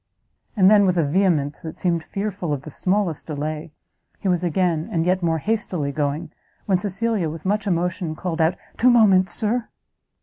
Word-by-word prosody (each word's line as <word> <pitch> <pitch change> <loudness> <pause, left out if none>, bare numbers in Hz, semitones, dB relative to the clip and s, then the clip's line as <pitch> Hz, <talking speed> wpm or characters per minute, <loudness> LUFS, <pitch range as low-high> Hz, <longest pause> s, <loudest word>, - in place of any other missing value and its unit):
And 190 -2 +6
then, 205 -1 +6
with 180 -1 +1
a 165 - +3
vehemence 150 -2 +1
that 160 -1 -8
seemed 170 -2 0
fearful 195 -4 -3
of 140 -2 -4
the 155 - -9
smallest 185 -1 -1
delay, 155 +1 -4 0.5
he - - -4
was 180 -1 +1
again, 175 0 0
and 165 -3 0
yet 185 +1 +1
more 165 -1 +1
hastily 180 -6 -1
going, 150 +2 -2 0.3
when 190 -3 +2
Cecilia, 200 -2 0
with 160 +2 -8
much 205 +2 0
emotion, 175 -2 -1
called 170 0 -3
out, 160 +3 +2 0.2
"Two 250 - +4
moments, 200 -6 +5
Sir!" 225 +2 -1
180 Hz, 175 wpm, -22 LUFS, 160-195 Hz, 0.5 s, And